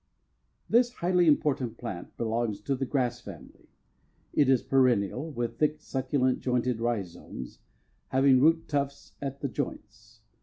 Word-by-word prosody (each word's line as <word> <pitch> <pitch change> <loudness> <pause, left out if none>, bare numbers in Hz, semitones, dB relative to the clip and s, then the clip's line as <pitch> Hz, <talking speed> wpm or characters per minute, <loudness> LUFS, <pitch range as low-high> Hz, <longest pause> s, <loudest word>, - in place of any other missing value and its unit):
This 240 +1 +3
highly 180 -4 +2
important 135 -6 +2
plant 95 -8 -7
belongs 115 -2 -1
to 135 +5 -1
the 135 0 -3
grass 125 -3 0
family. 85 - -12 0.7
It 145 -3 +3
is 130 -3 +4
perennial, 130 +1 +2
with 120 -4 -4
thick, 150 0 +1
succulent, 130 -2 0
jointed 125 -2 0
rhizomes, 95 - -4 0.5
having 135 0 +4
root 165 +2 +4
tufts 140 -1 -3
at 140 0 -5
the 140 - 0
joints. 110 -4 -7
130 Hz, 130 wpm, -28 LUFS, 115-140 Hz, 0.7 s, is